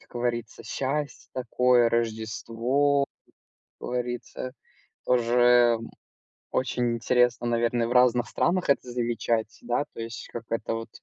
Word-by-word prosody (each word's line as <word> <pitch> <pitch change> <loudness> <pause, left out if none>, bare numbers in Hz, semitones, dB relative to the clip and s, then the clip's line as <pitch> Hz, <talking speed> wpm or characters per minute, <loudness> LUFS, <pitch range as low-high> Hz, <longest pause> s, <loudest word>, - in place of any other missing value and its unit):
как - - -24
говорится, 120 -2 -3
счастье 140 +2 -3
такое, 125 -1 +3
Рождество. 115 +5 0 0.8
Как - - -6
говорится, 125 +1 -4 0.5
тоже, 120 -1 +4
м, 115 - -8 0.6
очень 125 -2 0
интересно, 125 +1 +2
наверное, 120 0 +1
в - - -5
разных 125 -1 +4
странах 180 -1 0
это 135 -2 +2
замечать, 115 -2 -1
да. 120 +3 0
То - - -10
есть, 115 0 -7
как 120 - -6
это 115 0 -1
вот, 115 0 -6
120 Hz, 125 wpm, -26 LUFS, 115-125 Hz, 0.8 s, тоже